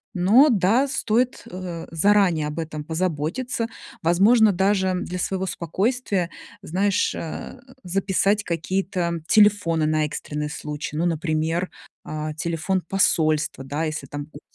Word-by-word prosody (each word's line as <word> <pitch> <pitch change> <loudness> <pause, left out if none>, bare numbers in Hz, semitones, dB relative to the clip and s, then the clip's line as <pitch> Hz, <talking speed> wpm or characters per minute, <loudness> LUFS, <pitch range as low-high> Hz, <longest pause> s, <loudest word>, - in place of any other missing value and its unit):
Но 215 +12 +6
да, 225 +4 +3
стоит, 250 -1 0
э, 180 -2 -6
заранее 175 -2 +3
об 150 +1 -6
этом 155 -2 -4
позаботиться. 175 - -2 0.3
Возможно, 205 +7 +5
даже 190 0 +1
для 180 0 -4
своего 190 +1 -1
спокойствия, 190 - -1 0.3
знаешь, 195 +4 +1
э, 165 +9 -6 0.2
записать 195 +3 +1
какие-то 175 0 -2
телефоны 205 -7 +4
на 155 0 +1
экстренный 150 0 -4
случай. 150 0 -5
Ну, 165 - +1
например, 165 +1 -1 0.4
э, 155 0 -4
телефон 170 +4 -1
посольства, 155 -7 +1
да, 145 +4 -3
если 155 -3 -3
там 145 +2 -5
будут 145 0 -14
175 Hz, 125 wpm, -23 LUFS, 155-200 Hz, 0.4 s, Но